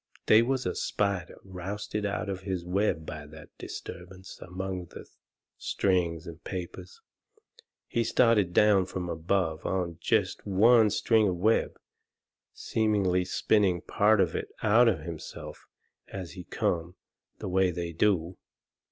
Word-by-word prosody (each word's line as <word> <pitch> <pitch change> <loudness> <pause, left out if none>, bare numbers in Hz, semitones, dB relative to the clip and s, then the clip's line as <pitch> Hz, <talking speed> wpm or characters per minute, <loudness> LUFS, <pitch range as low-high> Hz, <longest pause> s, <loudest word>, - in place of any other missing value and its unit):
They 110 - +7
was 130 +2 0
a - - 0
spider 100 -4 -2
rousted 100 +3 -4
out 100 +1 -3
of 95 -1 -4
his 95 -3 -4
web 90 -3 0
by 75 -1 -7
that 80 +1 -14
disturbance 95 +2 -9
among 90 0 -5
the - - -11 0.5
strings 85 -4 0
and 85 0 -10
papers. 95 - -7 0.9
He 120 - 0
started 115 -5 +3
down 100 -1 +4
from 90 -2 -4
above 80 -1 -1
on 85 -3 -2
jest - - 0
one 110 +3 +5
string 110 +1 +3
of 90 - 0
web, 110 +6 +1 0.7
seemingly 100 -5 0
spinning 95 -2 +2
part 105 +2 +3
of 95 - +2
it - - -3 0.2
out 115 +3 +5
of 110 - +1
himself 85 -3 -8 0.4
as 95 -3 -7
he 90 -2 -9
come, 85 +1 -2 0.4
the - - -6
way 95 0 +2
they 85 -1 -4
do. 90 -1 +1
95 Hz, 135 wpm, -28 LUFS, 90-105 Hz, 0.9 s, They